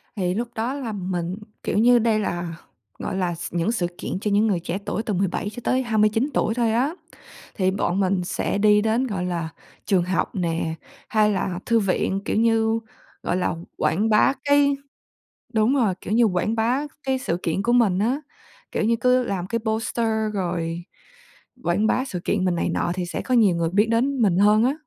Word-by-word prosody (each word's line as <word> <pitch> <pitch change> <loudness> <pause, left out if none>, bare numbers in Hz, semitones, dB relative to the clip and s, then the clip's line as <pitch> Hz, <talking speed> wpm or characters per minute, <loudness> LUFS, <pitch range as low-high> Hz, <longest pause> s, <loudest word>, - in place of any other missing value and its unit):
Thì 180 -3 0
lúc 235 +5 -2
đó 235 +4 -1
là 265 -6 -4
mình, 185 -3 -3 0.3
kiểu - - -1
như, 240 +2 +6
đây 220 -1 +2
là, 175 -4 -3 0.4
gọi - - -3
là, 175 -2 -1
s 170 - -7
những 175 +6 +1
sự 180 -7 0
kiện - - -4
cho 210 - -1
những 210 +2 +3
người 190 -5 +1
trẻ 175 +2 -3
tuổi 220 - -2
từ 210 - -2
17 190 +2 -1
cho 215 - -8
tới 260 0 +2
29 220 +3 +2
tuổi 220 - +1
thôi 235 -2 +1
á. 265 +9 +1 0.6
Thì 185 -2 +1
bọn 195 -1 -1
mình 190 -1 +1
sẽ 190 - -2
đi 210 0 +5
đến, 225 +4 +1
gọi 190 -5 -3
là, 170 -3 -2 0.4
trường 190 -4 +2
học 185 +2 -1
nè, 165 -2 -1 0.3
hay 215 -1 +3
là 185 -2 -2
thư 230 -1 +3
viện, 195 0 0
kiểu - - 0
như, 225 0 +2 0.4
gọi 180 - 0
là, 180 - 0 0.2
quảng 190 +9 +1
bá 210 +5 +4
cái 285 0 +4 0.8
đúng 220 +5 +3
rồi, 225 -9 +2
kiểu 205 - -5
như, 235 +1 +5
quảng 210 +2 +1
bá 240 +5 +1 0.2
cái 265 -1 0
sự 180 -10 -2
kiện 170 +4 -1
của 240 - +1
mình 220 -7 +3
á. 245 +8 +1 0.5
Kiểu - - 0
như, 230 +1 +3
cứ 250 0 +3
làm 185 -4 -3
cái 230 +3 -1
poster 225 +1 -1 0.3
rồi 170 -2 -2 0.8
quảng 185 +5 +2
bá 255 +3 +1
sự 185 -10 -5
kiện 195 -3 0
mình 175 - +1
này 170 - 0
nọ 175 - -1
thì 180 -1 -3
sẽ - - -4
có 255 - -1
nhiều 205 -7 +4
người 165 -1 0
biết 205 +4 +3
đến 255 +3 +1
mình 190 -4 +3
hơn 210 +2 +5
á. 265 +3 +2
210 Hz, 210 wpm, -23 LUFS, 180-230 Hz, 0.8 s, như